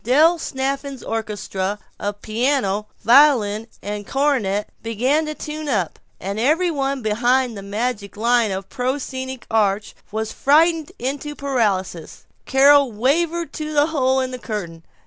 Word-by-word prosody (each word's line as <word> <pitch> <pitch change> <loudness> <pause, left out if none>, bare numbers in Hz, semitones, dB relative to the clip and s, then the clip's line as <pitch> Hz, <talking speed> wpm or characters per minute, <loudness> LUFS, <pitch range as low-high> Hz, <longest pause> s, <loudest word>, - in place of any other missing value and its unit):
Del 310 +8 +4
Snafflin's 270 -1 -3
orchestra 205 -3 -3 0.2
of 205 0 -4
piano, 215 -3 0 0.2
violin, 235 -5 +5 0.2
and 205 0 -5
cornet 250 -8 0
began 255 +8 0
to 305 - -4
tune 305 0 -5
up 190 - -1 0.2
and 200 +3 -4
every 320 +9 +2
one 275 -3 -2
behind 240 +3 +1
the 200 - -7
magic 205 0 -3
line 235 0 +3
of 190 0 -4
the - - -21
proscenic 260 0 -3
arch 210 -2 +1 0.2
was 220 +1 -3
frightened 320 +4 +3
into 280 +4 -4
paralysis. 205 - -2 0.2
Carol 280 0 +5
wavered 325 +9 0
to 310 0 -5
the 290 0 +4
hole 265 -2 +2
in 260 0 -3
the 255 - -6
curtain. 175 -8 -5
250 Hz, 140 wpm, -21 LUFS, 210-280 Hz, 0.2 s, violin